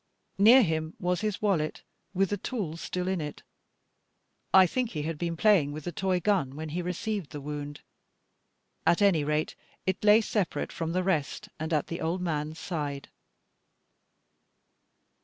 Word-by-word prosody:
Near 235 +6 +8
him 160 -3 -2
was 180 0 0
his 215 -1 -2
wallet, 170 -7 0 0.3
with 195 +1 +2
the 205 - 0
tools 180 -6 -4
still 180 0 -3
in 190 -3 0
it; 150 -1 -6 1.1
I 190 -1 +8
think 245 +6 -1
he 155 -8 -4
had 160 -1 -4
been 170 -1 -2
playing 180 -8 +4
with 155 0 -7
the 175 - -4
toy 185 +2 0
gun 175 -9 +1
when 155 +1 -5
he 170 +4 -2
received 180 0 -3
the 150 - -7
wound; 145 0 -6 1.0
at 170 +4 +3
any 180 -7 +4
rate 150 +1 -1 0.3
it 190 +1 -1
lay 210 +1 +7
separate 205 -4 -1
from 165 0 -3
the 185 +1 +1
rest, 165 -7 -1
and 160 +1 -3
at 150 -3 +1
the 170 - -5
old 165 +3 -1
man's 155 -3 -2
side. 145 -6 -4
170 Hz, 160 wpm, -28 LUFS, 155-195 Hz, 1.1 s, Near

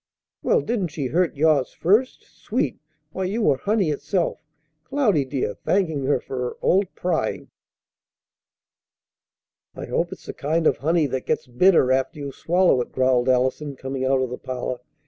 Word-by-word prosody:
"Well, 480 -1 +2
didn't 225 - -1
she 150 -3 -5
hurt 170 +6 +1
yours 145 -3 +2
first? 215 +10 +1
Sweet! - - -3 0.3
Why, 190 - -3
you 215 +5 -1
were 140 -7 +3
honey 200 -1 +1
itself, 175 +4 -1 0.4
Cloudy, 235 - +1
dear, 130 -6 -2
thanking 160 - 0
her 135 -1 +2
for 130 - -7
her 125 -1 -2
old 195 +2 +2
prying!" 165 -11 -2 2.2
"I - - -6
hope - - -1
it's - - -10
the - - -6
kind 160 +3 -1
of - - +3
honey 160 +2 +2
that 130 -2 -3
gets - - 0
bitter 130 +2 +4
after 130 +2 0
you 140 -1 -5
swallow 175 -2 +2
it!" - - -6
growled 130 -1 +2
Allison, 130 +3 +1
coming 130 0 -4
out 130 0 +2
of 125 - -4
the 125 - -5
parlor. 125 -1 -4
145 Hz, 165 wpm, -23 LUFS, 130-185 Hz, 2.2 s, bitter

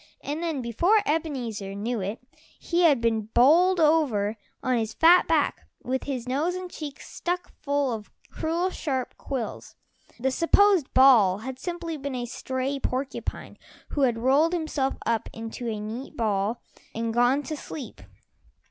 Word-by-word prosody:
And 295 +3 -3
then 320 -6 -2
before 345 - +3
Ebenezer 245 -11 -2
knew 225 +3 -2
it, 200 +4 -3 0.4
he 345 0 0
had 295 -8 +5
been 225 -2 0
bowled 340 +9 +5
over 280 -10 +2 0.3
on 255 -3 +1
his 220 -1 -3
fat 345 +3 +6
back, - - +1 0.2
with 260 +1 -2
his 255 -4 -4
nose 300 +8 0
and 365 -1 -6
cheeks 290 -3 -8
stuck 355 +1 -3
full 285 -3 0
of 215 -2 -7 0.2
cruel 340 +4 -1
sharp 265 -8 -3
quills. 260 -5 -5 0.4
The 265 +2 +1
supposed 350 +2 +4
ball 235 -8 +6
had 260 -1 -6
simply 345 -1 -4
been 280 -1 -5
a 245 -1 -3
stray 260 +3 -3
porcupine 265 +1 -4 0.3
who 290 - -2
had 245 -4 +3
rolled 275 +8 +3
himself 310 -5 -1
up 230 -1 0
into 225 +2 -6
a 215 -2 -3
neat 230 +8 -7
ball 215 0 0 0.3
and 230 0 -2
gone 245 +4 +3
to 310 - -4
sleep. 285 -2 -8
265 Hz, 155 wpm, -26 LUFS, 230-320 Hz, 0.4 s, fat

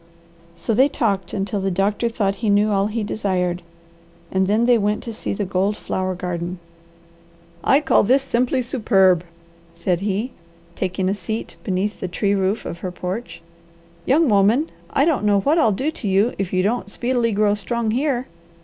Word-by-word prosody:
So 170 +7 -2
they 260 +6 +4
talked 200 -10 -1
until 200 0 -2
the 195 - 0
doctor 200 +5 0
thought 200 -4 -1
he 225 - -1
knew 205 +1 +3
all 200 0 +2
he 220 +1 -2
desired, 180 -4 -1 0.7
and 190 0 +1
then 215 +4 +2
they 240 -1 +4
went 210 +1 0
to 230 - -6
see - - -4
the 205 0 -2
gold 195 +2 0
flower 185 0 -2
garden. 175 0 -4 1.1
"I 275 - +4
call 290 - +4
this 260 +6 +3
simply 255 0 0
superb," 195 -8 +3 0.5
said 175 +1 -1
he, 210 +5 -1 0.4
taking 185 +1 -2
a 190 - +2
seat 215 +3 -5
beneath 195 +2 -1
the - - -3
tree 200 +3 0
roof 195 +2 0
of 170 - -6
her 185 - -4
porch. 180 +1 -6 0.6
"Young 310 +4 +4
woman, 215 +7 +4 0.2
I 280 - +2
don't 315 -9 +1
know 205 -1 +3
what 305 - +2
I'll 225 - +4
do 265 +10 -1
to 235 - -6
you 200 +5 +2
if 195 -2 -2
you 185 0 +1
don't 215 +1 -1
speedily 240 +1 0
grow 205 0 +2
strong 220 +2 -1
here. 260 0 0
205 Hz, 180 wpm, -21 LUFS, 190-235 Hz, 1.1 s, they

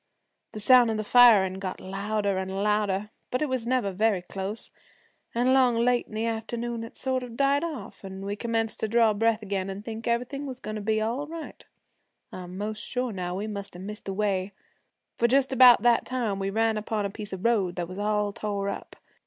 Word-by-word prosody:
The 215 - -6
sound 245 +2 +6
of 220 - -1
the 215 - -2
firin' 205 -5 +6
got 185 -1 -5
louder 200 +1 -2
an' 190 0 -4
louder, 205 +1 0 0.2
but 250 +4 0
it 300 - -1
was 255 -3 -2
never 245 -5 +1
very 200 -1 +1
close, 195 +4 -5 0.6
and 240 +2 +2
along 260 -2 +4
late 240 +1 +2
in 215 - -10
the 220 +1 -1
afternoon 230 +1 -3
it 230 - -10
sort 260 -1 -1
of 240 -2 -8
died 280 +2 +3
off, 315 -10 -6
an' 190 0 -7
we 200 +1 -2
commenced 225 0 -2
to 220 - 0
draw 225 0 +4
breath 225 +1 +1
again, 195 -1 -2
and 195 +2 -7
think 225 0 -6
everything 250 +4 -1
was 255 -2 -7
goin' 215 -3 -6
to 215 - -4
be 215 +1 +1
all 240 +7 -2
right. 325 0 -8 0.7
I'm 180 0 -8
'most 210 +1 -4
sure 250 -1 -2
now 180 -1 -3
we 200 +3 -3
must 200 -3 -6
have 180 - -8
missed 210 +2 -7
the 195 - -3
way, 195 -1 -1 0.7
for 235 - +4
just 270 +2 +2
about 250 -2 +8
that 240 -1 +4
time 235 -6 -2
we 195 0 -1
ran 220 +2 +1
upon 215 -1 -2
a 200 - -3
piece 210 0 -7
of 190 +1 -6
road 200 -7 +2
that 175 -1 -3
was 185 +2 -8
all 210 0 0
tore 200 -1 -2
up. - - -7
215 Hz, 215 wpm, -27 LUFS, 200-240 Hz, 0.7 s, about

